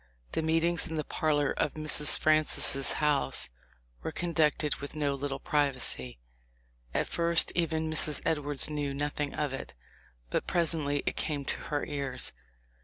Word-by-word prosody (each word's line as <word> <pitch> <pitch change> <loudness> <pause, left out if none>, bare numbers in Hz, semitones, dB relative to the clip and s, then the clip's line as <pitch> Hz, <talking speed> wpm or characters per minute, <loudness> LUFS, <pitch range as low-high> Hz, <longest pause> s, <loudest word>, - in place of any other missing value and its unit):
The - - -1
meetings 165 +1 +2
in 160 - -5
the 155 - -1
parlor 145 -2 0
of 150 - -1
Mrs. 155 -1 +3
Francis' 155 -3 +3
house 150 - +1 0.5
were - - -4
conducted 155 -3 0
with 140 +2 -8
no 145 -2 0
little 140 0 -3
privacy. 130 - 0 0.7
At - - -1
first 170 0 +4
even 160 -2 0
Mrs. 155 -1 +1
Edwards 145 -3 +2
knew 145 -2 -3
nothing 145 0 -3
of 145 -3 -2
it, 135 - -7 0.6
but - - -1
presently 155 -4 0
it - - -1
came 145 -3 -2
to - - -1
her 145 -2 -1
ears. 135 -3 -2
150 Hz, 145 wpm, -30 LUFS, 140-155 Hz, 0.7 s, first